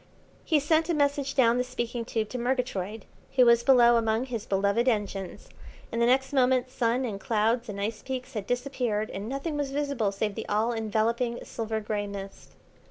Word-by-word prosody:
He 315 -3 +3
sent 315 +3 +2
a 340 - +2
message 285 -1 0
down 240 -2 +4
the - - +2
speaking 240 -2 -4
tube 220 -2 -2
to 250 - -4
Murgatroyd, 230 -5 -2 0.3
who 255 -2 +6
was 235 0 +6
below 240 -2 +6
among 225 +1 +1
his 235 -4 -5
beloved 200 +5 +1
engines, 200 -5 -2 0.4
and 230 - -1
the 235 - +4
next 265 +2 +2
moment 255 -1 +2
sun 245 +1 0
and 205 -5 -4
clouds 225 +3 0
and 200 -1 -5
ice 215 +2 -3
peaks 260 0 -5
had 210 -3 -4
disappeared 245 -4 -1
and 200 +3 -5
nothing 285 +3 -3
was 285 -2 -1
visible 275 -7 -1
save 205 +1 -2
the - - -6
all 215 +3 +1
enveloping 230 +2 -1
silver 220 -1 -3
grey 210 -1 -3
mist. 195 -1 -9
235 Hz, 185 wpm, -27 LUFS, 215-260 Hz, 0.4 s, who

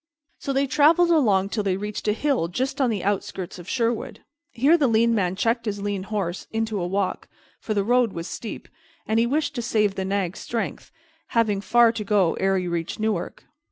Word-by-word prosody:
So 275 - -3
they 275 +1 +2
traveled 310 +5 +4
along 205 - +3
till 210 - -1
they 195 -2 0
reached 210 +2 -5
a 210 - +3
hill 260 - 0
just 265 +10 -2
on 260 - +3
the 205 -5 -2
outskirts 190 -2 -3
of 175 - -10
Sherwood. 235 -2 -1 0.3
Here 275 +8 +3
the 300 -5 +3
lean 230 0 +3
man 185 -4 0
checked 230 +4 0
his 205 -1 -2
lean 200 -1 -2
horse 195 -3 -3
into 220 -3 -1
a 175 - -1
walk, 195 +1 -2 0.3
for 215 - -3
the 200 - +2
road 245 0 +3
was 170 -1 -6
steep, 225 - -7 0.4
and 220 +1 +1
he 235 - +3
wished 295 +3 0
to 245 - -3
save 210 -4 +1
his 190 -1 -3
nag's 195 -1 -2
strength, 230 -1 -4 0.5
having 210 -4 +2
far 235 +3 +5
to 225 -2 -4
go 200 -5 +2
ere 195 0 +2
he 180 -1 -2
reached 170 +1 -3
Newark. 215 -5 -2
215 Hz, 205 wpm, -24 LUFS, 195-240 Hz, 0.5 s, far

